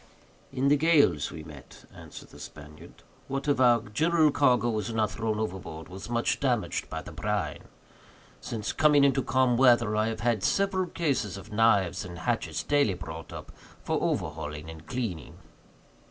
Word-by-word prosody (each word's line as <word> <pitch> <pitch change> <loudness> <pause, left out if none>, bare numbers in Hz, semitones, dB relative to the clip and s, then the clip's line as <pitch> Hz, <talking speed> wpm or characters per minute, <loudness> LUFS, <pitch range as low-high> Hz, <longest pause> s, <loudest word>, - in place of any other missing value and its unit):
"In 135 +1 +1
the 145 - +5
gales 160 0 +3
we 80 - -9
met," 75 -4 -13
answered - - -11
the - - -15
Spaniard, 75 +1 -12 0.2
"what 135 +1 -4
of 140 -3 +2
our 120 -2 +5
general 155 +8 +2
cargo 125 -4 +3
was 110 +1 -3
not 110 -2 0
thrown 110 -1 -2
overboard 90 -6 -5
was 95 +4 -9
much 120 0 0
damaged 125 -6 -1
by - - -5
the - - -10
brine. - - -3 0.7
Since 110 -3 -4
coming 150 -2 +4
into 135 -1 +3
calm 130 -2 +2
weather, 120 -4 +4
I 110 +1 +1
have 110 -1 -4
had 115 -3 +1
several 195 -2 +1
cases 140 - -1
of 100 +4 -11
knives 100 -5 +2
and 85 -1 -9
hatchets 85 - -2
daily 145 -10 +2
brought 80 -2 -8
up - - -9 0.3
for - - -1
overhauling 75 +2 -3
and 80 0 -13
cleaning." 115 -11 -4
115 Hz, 165 wpm, -28 LUFS, 95-135 Hz, 0.7 s, the